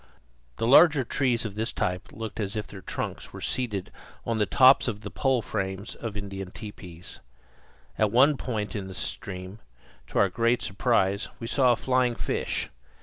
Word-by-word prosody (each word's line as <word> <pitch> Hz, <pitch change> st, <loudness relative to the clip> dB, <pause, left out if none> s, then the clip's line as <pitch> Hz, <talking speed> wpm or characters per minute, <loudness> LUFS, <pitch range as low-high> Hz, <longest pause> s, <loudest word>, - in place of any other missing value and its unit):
The -, -, -1 dB
larger 145 Hz, +3 st, +7 dB
trees 120 Hz, -1 st, 0 dB
of 105 Hz, -, -4 dB
this 110 Hz, +2 st, -2 dB
type 90 Hz, 0 st, -2 dB
looked 110 Hz, 0 st, -7 dB
as 100 Hz, 0 st, -2 dB
if 105 Hz, -1 st, -2 dB
their 95 Hz, -, -10 dB
trunks -, -, -4 dB
were -, -, -9 dB
seated 105 Hz, -7 st, -2 dB, 0.3 s
on 115 Hz, -1 st, -1 dB
the 105 Hz, -, +2 dB
tops 130 Hz, +1 st, +6 dB
of 105 Hz, -3 st, -3 dB
the -, -, -7 dB
pole 130 Hz, -4 st, +1 dB
frames 95 Hz, +1 st, -3 dB
of 110 Hz, -3 st, -6 dB
Indian 95 Hz, -2 st, -6 dB
tepees. 90 Hz, -4 st, -10 dB, 0.8 s
At 110 Hz, -, +4 dB
one 135 Hz, +6 st, +5 dB
point 110 Hz, -6 st, -3 dB
in 100 Hz, -2 st, -4 dB
the 95 Hz, -, -8 dB
stream, 95 Hz, -, -6 dB, 0.5 s
to -, -, -5 dB
our 100 Hz, -, +5 dB
great 115 Hz, +5 st, +1 dB
surprise, 100 Hz, -2 st, +1 dB
we 115 Hz, -, -5 dB
saw 125 Hz, +1 st, +4 dB
a -, -, +1 dB
flying 125 Hz, 0 st, +1 dB
fish. -, -, -2 dB
110 Hz, 175 wpm, -27 LUFS, 95-125 Hz, 0.8 s, larger